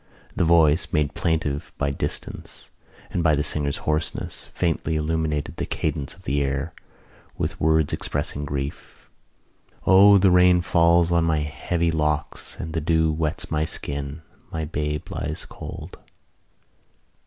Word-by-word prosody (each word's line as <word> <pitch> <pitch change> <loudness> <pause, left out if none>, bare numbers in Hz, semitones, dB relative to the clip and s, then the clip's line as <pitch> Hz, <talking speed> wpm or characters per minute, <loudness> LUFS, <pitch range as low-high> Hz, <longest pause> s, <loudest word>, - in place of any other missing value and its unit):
The - - +2
voice, 80 -1 +4
made 75 -2 +1
plaintive 80 -4 -1
by 70 -1 0
distance 70 - -5 0.4
and 85 - 0
by 80 -2 +4
the 75 - 0
singer's 70 -2 -1
hoarseness, 75 +1 -2
faintly 80 -2 -1
illuminated 75 -1 -1
the - - -3
cadence 75 +1 -3
of 95 - -19
the 70 0 0
air 70 +4 -2 0.6
with - - -3
words 80 -1 +3
expressing 75 0 -3
grief: 70 0 -6 0.7
O, 100 +2 +8
the 95 -1 +4
rain 90 0 +6
falls 85 -1 +3
on 85 -1 +3
my 80 -2 +1
heavy 85 +3 -1
locks 75 -1 -2
And 80 -1 -6
the 80 - -1
dew 80 0 +2
wets 75 -1 -2
my 75 0 +1
skin, 70 0 -3 0.3
My 80 -1 -3
babe 75 +1 -3
lies 75 +2 -4
cold.... - - -9
80 Hz, 140 wpm, -24 LUFS, 75-85 Hz, 0.7 s, O